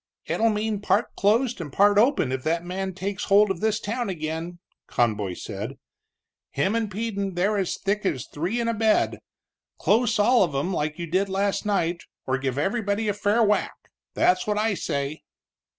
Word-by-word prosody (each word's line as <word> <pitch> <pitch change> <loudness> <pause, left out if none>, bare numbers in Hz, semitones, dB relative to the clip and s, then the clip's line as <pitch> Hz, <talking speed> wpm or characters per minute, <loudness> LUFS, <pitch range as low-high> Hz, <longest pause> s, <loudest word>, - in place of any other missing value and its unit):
"It'll 225 +1 +1
mean 210 -1 -1
part 205 +2 +1
closed 225 +2 +2
and 150 -4 -6
part 205 +5 +4
open 230 - +3
if 130 0 -2
that 165 +4 -1
man 190 +1 -4
takes 195 +1 -3
hold 205 0 +5
of 180 - -3
this 220 +1 +1
town 225 +1 -3
again," 165 0 -4 0.3
Conboy 105 -6 0
said. 105 +10 -6 0.7
"Him 150 +9 0
and 225 -2 0
Peden 200 -3 -3
they're 195 +4 +1
as 190 - -1
thick 205 +2 -1
as 135 -9 -2
three 175 +11 -3
in 235 - -1
a 230 - +1
bed. 220 0 +2 0.6
Close 230 +1 +2
all 240 +4 +4
of 170 -7 +1
'em, 175 +8 -1
like 150 -1 -2
you 170 - -4
did 185 +4 0
last 200 +2 0
night, 175 -4 0 0.2
or 130 +1 0
give 135 -1 -2
everybody 205 +5 0
a - - +1
fair 205 +3 +2
whack. 210 -1 +1 0.4
That's 180 +2 +2
what 210 0 0
I 215 0 +1
say." 140 -4 -3
195 Hz, 180 wpm, -25 LUFS, 165-210 Hz, 0.7 s, hold